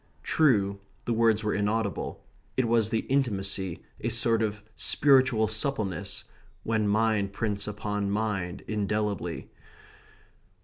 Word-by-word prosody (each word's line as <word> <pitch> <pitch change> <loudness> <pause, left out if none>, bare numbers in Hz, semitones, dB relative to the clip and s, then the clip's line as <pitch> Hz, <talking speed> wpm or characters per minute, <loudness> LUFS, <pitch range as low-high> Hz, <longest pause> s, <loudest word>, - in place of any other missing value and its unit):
True, 100 -10 +2 0.3
the 120 - 0
words 115 -1 +3
were 105 - 0
inaudible. 105 -2 -2 0.3
It 130 -2 +2
was 115 -2 +3
the 115 -1 0
intimacy, 100 -9 -1 0.2
a 115 - -1
sort 115 0 +3
of 105 -1 -2
spiritual 130 -6 +4
suppleness, 105 - -1 0.4
when 110 -2 0
mind 105 -2 +1
prints 100 -2 -2
upon 105 -1 -2
mind 100 -4 -2
indelibly. 105 -4 -2
105 Hz, 115 wpm, -28 LUFS, 100-115 Hz, 0.4 s, spiritual